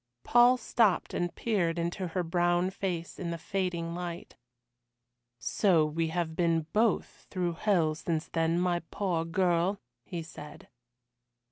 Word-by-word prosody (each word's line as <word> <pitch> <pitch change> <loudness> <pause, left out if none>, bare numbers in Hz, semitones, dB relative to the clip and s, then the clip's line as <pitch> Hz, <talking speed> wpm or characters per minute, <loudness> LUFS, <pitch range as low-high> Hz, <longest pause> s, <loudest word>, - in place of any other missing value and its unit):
Paul 245 +1 +6
stopped 220 -4 +1
and 175 0 -2
peered 180 -7 0
into 170 +2 -2
her 175 +2 -2
brown 175 +2 +1
face 180 -4 -4
in 175 -3 -3
the 170 - -3
fading 175 -2 -2
light. 175 0 -6 1.0
"So 155 - +2
we 160 +2 -1
have 160 -1 -2
been 165 -2 +1
both 220 +1 0
through 180 -3 -1
hell 170 -4 +2
since 160 +1 -3
then, 165 +1 +1
my 175 -1 +1
poor 180 -5 -1
girl?" 175 +2 +1 0.2
he 170 +4 -5
said. 150 -2 -11
175 Hz, 135 wpm, -30 LUFS, 165-185 Hz, 1.0 s, Paul